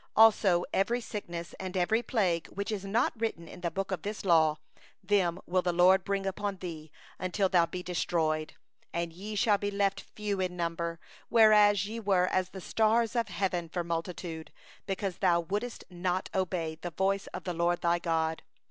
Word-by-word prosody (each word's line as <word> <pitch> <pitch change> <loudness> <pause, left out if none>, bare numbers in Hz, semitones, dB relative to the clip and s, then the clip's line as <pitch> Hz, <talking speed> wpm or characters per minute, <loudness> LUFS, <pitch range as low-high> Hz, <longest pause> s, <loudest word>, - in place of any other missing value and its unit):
61Also 205 -5 +6
every 235 +5 +2
sickness, 175 -7 -6
and 185 0 -4
every 215 +6 +2
plague, 185 -9 0
which 200 +2 -4
is 205 -3 -3
not 220 +6 +1
written 170 -7 -2
in 180 - -11
the 170 - 0
book 195 +3 -3
of 190 - -2
this 210 0 -5
law, 160 -4 +4 0.5
them 185 -3 +2
will 185 +1 +1
the 180 - 0
LORD 180 +2 +5
bring 200 -1 -1
upon 195 +1 -2
thee, 160 -4 -7 0.3
until 190 +2 +1
thou 175 -3 +3
be 180 +1 -6
destroyed. 160 -3 -1 0.4
62And 170 -1 -2
ye 210 +4 -6
shall 205 -1 +3
be 205 - -1
left 200 -1 0
few 205 -2 -4
in 180 -1 -2
number, 170 -1 -2 0.3
whereas 210 -3 +6
ye 225 +2 -5
were 195 -4 +2
as 185 -1 +1
the 190 - -9
stars 225 +3 +2
of 230 -2 +1
heaven 180 -4 -2
for 175 +1 -2
multitude; 165 -1 -4 0.4
because 195 -1 -3
thou 175 -3 +4
didst 210 +7 -3
not 180 +1 -2
hearken 185 -2 0
unto 160 -1 -4
the 175 - -3
voice 195 +3 0
of - - -7
the 180 - -3
LORD 170 +1 +1
thy 170 0 +2
God. 160 -1 0
185 Hz, 185 wpm, -30 LUFS, 170-205 Hz, 0.5 s, 61Also